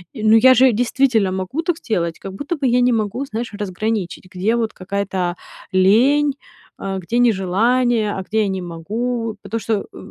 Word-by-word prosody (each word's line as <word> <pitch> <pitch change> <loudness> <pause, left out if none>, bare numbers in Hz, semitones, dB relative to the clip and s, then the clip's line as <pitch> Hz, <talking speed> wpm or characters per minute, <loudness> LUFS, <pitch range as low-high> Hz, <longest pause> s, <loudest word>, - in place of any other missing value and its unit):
Э, 220 - -6
ну 215 +1 +6
я 260 +3 +7
же 260 0 +6
действительно 235 -3 +1
могу 190 - -3
так 335 -1 -1
сделать, 170 - -2
как 195 - -8
будто 285 - -4
бы 280 - -2
я 245 0 +3
не 250 - +3
могу, 220 +4 -1
знаешь, 230 -3 -5
разграничить, 205 -1 -3
где 205 +6 +1
вот 230 -2 -1
какая-то, 195 +1 -4
а, - - -10 0.4
лень, 255 +10 +4 0.5
а, 195 -1 -3
где 230 +7 -2
нежелание, 225 +1 +2
а 190 - -4
где 220 +4 -4
я - - 0
не 190 -1 -3
могу. 220 +7 -3
Потому 210 +3 -4
что 215 0 -1
в - - -13
220 Hz, 190 wpm, -19 LUFS, 195-245 Hz, 0.5 s, я